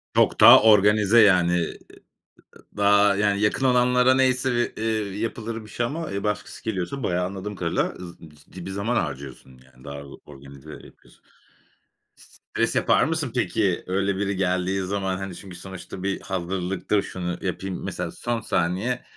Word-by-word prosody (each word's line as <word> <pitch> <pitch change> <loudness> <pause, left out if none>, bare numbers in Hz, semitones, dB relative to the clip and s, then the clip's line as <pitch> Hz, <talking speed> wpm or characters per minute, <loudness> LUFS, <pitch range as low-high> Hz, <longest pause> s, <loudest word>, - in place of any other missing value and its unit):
Çok - - +3
daha - - +10
organize, 105 +1 +5
yani. 90 -4 +4
Iıı, 85 - 0
ııı, - - -15 0.8
daha, 100 0 +4
yani, 100 0 +1
yakın 105 +5 +1
olanlara 125 0 +4
neyse 130 -1 +2
bir, 120 -2 -2
eee, 110 -3 -2
yapılır 115 0 -4
bir 105 - -14
şey 120 +3 -2
ama, 160 +5 -5
eee, 100 0 -4
başkası 105 -1 -4
geliyorsa 110 +5 -3
bayağı, 90 -4 0
anladım 100 +2 -6
kadarıyla, 85 -2 -1
z 85 -1 -10
biz 75 -3 -15
ciddi 85 +4 -12
bir - - -5
zaman 100 +5 -2
harcıyorsun 65 - -5
yani. 65 0 -21
Daha 70 0 -7 0.2
organize 70 +1 -13
yapıyorsun. - - -16 0.9
Stres - - -4
yapar - - +3
mısın 160 -6 -2
peki, 105 -6 0
öyle 95 +1 -1
biri 100 0 -2
geldiği 95 +1 0
zaman? 95 0 -2
Hani, 95 -1 -6
çünkü 95 -1 -11
sonuçta 95 +1 -9
bir 95 0 -2
hazırlıktır, 95 +2 -2
şunu 90 -3 -5
yapayım. 95 0 -4
Mesela, - - -4
son 120 -1 -3
saniye, 100 +7 -1
100 Hz, 160 wpm, -24 LUFS, 90-110 Hz, 0.9 s, daha